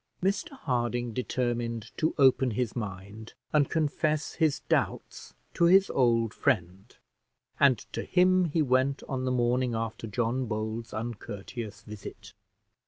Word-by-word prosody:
Mr 205 Hz, -, 0 dB
Harding 120 Hz, -, -1 dB
determined 120 Hz, -2 st, -2 dB
to 160 Hz, -, 0 dB
open 130 Hz, -2 st, +5 dB
his 115 Hz, 0 st, -2 dB
mind 105 Hz, 0 st, -7 dB, 0.2 s
and 145 Hz, -3 st, +3 dB
confess 155 Hz, 0 st, 0 dB
his 155 Hz, -4 st, +1 dB
doubts -, -, -2 dB, 0.2 s
to 170 Hz, -, +3 dB
his 190 Hz, +3 st, +5 dB
old 115 Hz, -3 st, +2 dB
friend; 95 Hz, -5 st, -1 dB, 0.6 s
and 135 Hz, -4 st, +5 dB, 0.2 s
to -, -, -2 dB
him 185 Hz, 0 st, +3 dB
he 160 Hz, -1 st, +1 dB
went 130 Hz, +1 st, +1 dB
on 130 Hz, -1 st, -2 dB
the 130 Hz, -, 0 dB
morning 125 Hz, 0 st, +1 dB
after 115 Hz, 0 st, -4 dB
John 120 Hz, +4 st, -1 dB
Bold's 110 Hz, +1 st, -4 dB
uncourteous 110 Hz, -1 st, -6 dB
visit. 105 Hz, 0 st, -10 dB
120 Hz, 130 wpm, -28 LUFS, 115-140 Hz, 0.6 s, open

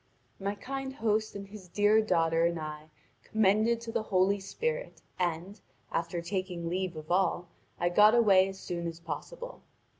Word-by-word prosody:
My 200 Hz, +1 st, -2 dB
kind 270 Hz, +4 st, -5 dB
host 215 Hz, -5 st, 0 dB
and 200 Hz, 0 st, -6 dB
his 200 Hz, -2 st, -11 dB
dear 205 Hz, +4 st, +4 dB
daughter 165 Hz, -4 st, +2 dB
I 155 Hz, 0 st, -7 dB, 0.3 s
commended 220 Hz, +2 st, +2 dB
to 230 Hz, -1 st, -6 dB
the -, -, 0 dB
Holy 200 Hz, -1 st, +2 dB
Spirit, 475 Hz, -, -3 dB, 0.2 s
and, 180 Hz, +3 st, -2 dB, 0.3 s
after 170 Hz, +1 st, -2 dB
taking 180 Hz, -2 st, -3 dB
leave 180 Hz, 0 st, -2 dB
of 155 Hz, +1 st, -8 dB
all, 180 Hz, -1 st, +1 dB, 0.3 s
I 175 Hz, -, +2 dB
got 210 Hz, +5 st, +6 dB
away 195 Hz, -5 st, +6 dB
as 190 Hz, 0 st, -7 dB
soon 170 Hz, -1 st, -4 dB
as 165 Hz, 0 st, -6 dB
possible. -, -, -7 dB
195 Hz, 155 wpm, -30 LUFS, 170-215 Hz, 0.3 s, got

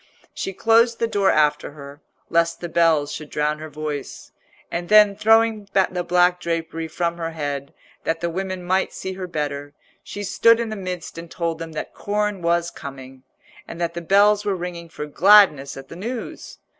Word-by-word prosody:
She -, -, -4 dB
closed 230 Hz, +4 st, +3 dB
the -, -, +1 dB
door 200 Hz, -4 st, +1 dB
after 150 Hz, -1 st, +2 dB
her, 140 Hz, 0 st, -11 dB, 0.3 s
lest 170 Hz, 0 st, +1 dB
the 175 Hz, -, -5 dB
bells 165 Hz, -4 st, +2 dB
should 155 Hz, -1 st, -7 dB
drown 150 Hz, 0 st, -1 dB
her 155 Hz, 0 st, -7 dB
voice, 150 Hz, -1 st, -6 dB, 0.4 s
and 175 Hz, 0 st, -4 dB
then 210 Hz, -1 st, +7 dB
throwing 220 Hz, -1 st, +3 dB
the 185 Hz, -2 st, +2 dB
black 180 Hz, 0 st, +3 dB
drapery 165 Hz, -1 st, -3 dB
from 170 Hz, +1 st, -2 dB
her 165 Hz, -1 st, -3 dB
head, 145 Hz, -3 st, -4 dB, 0.3 s
that 165 Hz, 0 st, -1 dB
the 170 Hz, 0 st, -2 dB
women 185 Hz, +1 st, -4 dB
might 185 Hz, +2 st, 0 dB
see 190 Hz, -, -5 dB
her 185 Hz, -1 st, -6 dB
better, 145 Hz, -3 st, -4 dB, 0.3 s
she 205 Hz, -, -7 dB
stood 230 Hz, +4 st, +4 dB
in 235 Hz, -1 st, -2 dB
the 215 Hz, -, -4 dB
midst 180 Hz, -4 st, -6 dB
and 170 Hz, 0 st, -10 dB
told 165 Hz, -1 st, -3 dB
them 165 Hz, -1 st, -7 dB
that 155 Hz, -, -6 dB
corn 210 Hz, -1 st, -2 dB
was 170 Hz, 0 st, +1 dB
coming, 135 Hz, -2 st, -10 dB, 0.5 s
and 170 Hz, -, -8 dB
that 170 Hz, -1 st, -1 dB
the 170 Hz, -, -5 dB
bells 205 Hz, +4 st, +4 dB
were 205 Hz, -2 st, 0 dB
ringing 175 Hz, -1 st, -6 dB
for 150 Hz, -2 st, -6 dB
gladness 155 Hz, -4 st, +5 dB
at 135 Hz, 0 st, -9 dB
the -, -, -10 dB
news. 230 Hz, +6 st, -6 dB
170 Hz, 185 wpm, -22 LUFS, 155-195 Hz, 0.5 s, then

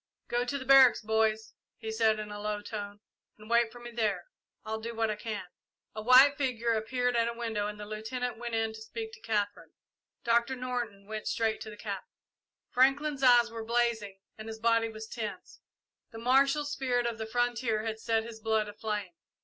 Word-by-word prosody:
"Go 240 Hz, +1 st, +1 dB
to 280 Hz, +3 st, -2 dB
the 260 Hz, -, -7 dB
barracks, 265 Hz, -1 st, +7 dB
boys," 220 Hz, 0 st, +1 dB, 0.2 s
he 220 Hz, -1 st, -5 dB
said, 220 Hz, -1 st, +3 dB
in 210 Hz, -1 st, -6 dB
a 205 Hz, -, -6 dB
low 210 Hz, 0 st, -3 dB
tone, 205 Hz, -1 st, -6 dB, 0.4 s
"and 215 Hz, 0 st, -14 dB
wait 235 Hz, 0 st, +3 dB
for 240 Hz, -, -12 dB
me 240 Hz, 0 st, -9 dB
there. 210 Hz, -6 st, -1 dB, 0.4 s
I'll 220 Hz, 0 st, -3 dB
do 230 Hz, +1 st, -5 dB
what 225 Hz, -1 st, +1 dB
I -, -, -2 dB
can." 210 Hz, -3 st, -5 dB, 0.5 s
A 215 Hz, -, -5 dB
white 260 Hz, +5 st, +7 dB
figure 235 Hz, -4 st, 0 dB
appeared 245 Hz, +3 st, 0 dB
at 230 Hz, 0 st, +3 dB
a 235 Hz, -, -2 dB
window 220 Hz, -3 st, -2 dB
and 210 Hz, 0 st, -6 dB
the 210 Hz, -, -6 dB
Lieutenant 225 Hz, +3 st, -4 dB
went 235 Hz, -1 st, -3 dB
in 225 Hz, 0 st, 0 dB
to 220 Hz, -, -10 dB
speak 445 Hz, -, -6 dB
to 475 Hz, -, -13 dB
Katherine. 205 Hz, -2 st, -2 dB, 0.5 s
Doctor 235 Hz, +2 st, +2 dB
Norton 245 Hz, -6 st, -4 dB
went 215 Hz, +1 st, -5 dB
straight 225 Hz, -3 st, 0 dB
to 220 Hz, -, -6 dB
the 210 Hz, -, -10 dB
Captain. -, -, -6 dB, 0.6 s
Franklin's 275 Hz, +3 st, +2 dB
eyes 240 Hz, -2 st, +6 dB
were 230 Hz, -1 st, -5 dB
blazing 225 Hz, -4 st, 0 dB, 0.2 s
and 220 Hz, -, -7 dB
his 220 Hz, 0 st, -6 dB
body 230 Hz, 0 st, +2 dB
was 220 Hz, 0 st, -8 dB
tense. 215 Hz, -4 st, -7 dB, 0.5 s
The 225 Hz, -, -10 dB
martial 275 Hz, +5 st, +3 dB
spirit 255 Hz, -4 st, 0 dB
of 235 Hz, -2 st, -2 dB
the 220 Hz, -, -4 dB
frontier 235 Hz, -2 st, 0 dB
had 220 Hz, 0 st, -3 dB
set 225 Hz, 0 st, +1 dB
his 225 Hz, -1 st, -9 dB
blood 220 Hz, -1 st, +1 dB
aflame. 210 Hz, -3 st, -4 dB
225 Hz, 200 wpm, -30 LUFS, 215-245 Hz, 0.6 s, barracks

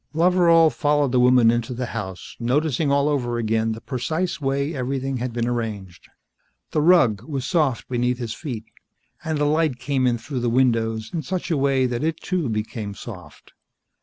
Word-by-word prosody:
Loveral 170 Hz, -1 st, +5 dB
followed 145 Hz, -3 st, +1 dB
the 125 Hz, -, +3 dB
woman 125 Hz, -2 st, +5 dB
into 120 Hz, +1 st, -2 dB
the 125 Hz, +1 st, -3 dB
house, 95 Hz, -5 st, -6 dB
noticing 140 Hz, +3 st, +1 dB
all 140 Hz, +1 st, +3 dB
over 125 Hz, -5 st, 0 dB
again 110 Hz, 0 st, 0 dB
the 110 Hz, -, -9 dB
precise 155 Hz, +8 st, -2 dB
way 140 Hz, +3 st, -1 dB
everything 135 Hz, 0 st, -2 dB
had 125 Hz, +1 st, -3 dB
been 120 Hz, 0 st, -2 dB
arranged. 110 Hz, -7 st, -4 dB, 0.6 s
The 155 Hz, -, +1 dB
rug 150 Hz, -, +4 dB
was 140 Hz, -5 st, -4 dB
soft 150 Hz, -9 st, 0 dB
beneath 125 Hz, 0 st, 0 dB
his 120 Hz, -3 st, -4 dB
feet, 120 Hz, -8 st, -6 dB, 0.6 s
and 160 Hz, -2 st, -1 dB
the 145 Hz, -, +1 dB
light 155 Hz, -3 st, +1 dB
came 130 Hz, 0 st, 0 dB
in 120 Hz, -1 st, +1 dB
through 125 Hz, +4 st, -5 dB
the 120 Hz, 0 st, 0 dB
windows 115 Hz, -3 st, +1 dB
in 165 Hz, -, -1 dB
such 185 Hz, +1 st, -4 dB
a -, -, +3 dB
way 135 Hz, -2 st, +2 dB
that 125 Hz, +1 st, -2 dB
it, 160 Hz, 0 st, 0 dB
too, 175 Hz, -8 st, -2 dB
became 105 Hz, -1 st, -4 dB
soft. 95 Hz, -6 st, -11 dB
130 Hz, 180 wpm, -23 LUFS, 115-150 Hz, 0.6 s, Loveral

